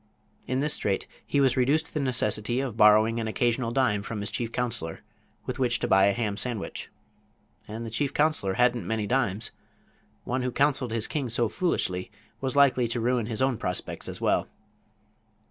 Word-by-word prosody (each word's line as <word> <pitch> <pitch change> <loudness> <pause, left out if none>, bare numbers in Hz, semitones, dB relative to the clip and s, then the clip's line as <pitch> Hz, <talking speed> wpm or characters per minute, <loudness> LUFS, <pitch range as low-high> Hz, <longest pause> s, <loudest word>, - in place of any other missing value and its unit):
In 130 +1 0
this 150 +1 +2
straight 100 -2 -1 0.2
he 145 - 0
was 135 -2 +3
reduced 140 +5 +2
to - - -6
the 150 - -1
necessity 120 -3 0
of 130 -5 -3
borrowing 110 +1 +5
an 110 - -2
occasional 120 +2 0
dime 120 -6 +1
from 105 +1 -5
his 100 0 -4
chief 115 -2 -2
counselor, 115 -10 -3 0.4
with - - -4
which 120 -2 +2
to - - -2
buy 95 0 +5
a - - +4
ham 105 -2 -2
sandwich. 120 -4 -3 0.8
And 110 +2 -6
the 115 - -6
chief 135 +5 0
counselor 145 -11 +1
hadn't 120 -5 +2
many 110 -2 -1
dimes. 115 -3 0 0.7
One 130 +1 -2
who 125 0 -1
counseled 140 -2 +1
his 115 -1 0
king 140 -5 -2
so 120 0 +1
foolishly 100 - -1 0.3
was 135 0 -2
likely 135 -4 +4
to 120 +1 -2
ruin 120 -1 0
his 115 +1 -1
own 130 -4 +1
prospects 90 0 -4
as - - -2
well. - - +1
120 Hz, 185 wpm, -27 LUFS, 110-130 Hz, 0.8 s, borrowing